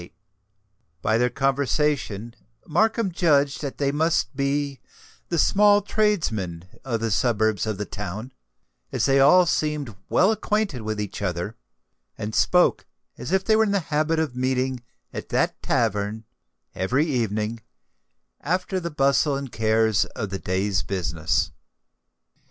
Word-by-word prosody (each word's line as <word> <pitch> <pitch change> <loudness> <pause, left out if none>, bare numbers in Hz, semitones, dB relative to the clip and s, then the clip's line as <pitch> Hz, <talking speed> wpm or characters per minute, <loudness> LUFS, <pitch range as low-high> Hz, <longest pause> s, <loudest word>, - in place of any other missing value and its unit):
By 110 +1 +2
their 125 +1 +3
conversation 135 -4 0 0.3
Markham 215 +4 +1
judged 145 -5 +2
that 140 -3 -5
they 140 -1 +1
must 150 -5 0
be 140 0 -1 0.5
the 170 - 0
small 205 +5 +4
tradesmen 115 - -1 0.2
of 115 -4 -2
the 115 -1 -1
suburbs 110 -1 +1
of 110 -2 -2
the 105 - -3
town, 105 +5 -6 0.6
as - - 0
they 135 0 +4
all 175 +7 +6
seemed 150 - -1
well 190 +4 +4
acquainted 210 - -1
with 110 0 -3
each 105 -1 -5
other, 90 +3 -3 0.6
and 105 +1 -5
spoke 180 +9 +3 0.3
as 125 - -5
if 190 0 +1
they 220 - +4
were 220 - +4
in 205 -2 0
the 200 - +3
habit 155 +2 +2
of 155 -6 -1
meeting 130 0 -1 0.3
at - - -6
that - - 0
tavern 110 0 -1 0.5
every 125 - +1
evening 115 -5 -1 0.8
after 180 +3 -1
the 170 -1 -4
bustle 140 -1 +2
and 135 -2 -5
cares 110 -1 +2
of 110 -6 -6
the 95 - -3
day's 95 0 0
business. 85 -5 -1
130 Hz, 140 wpm, -24 LUFS, 110-155 Hz, 0.8 s, all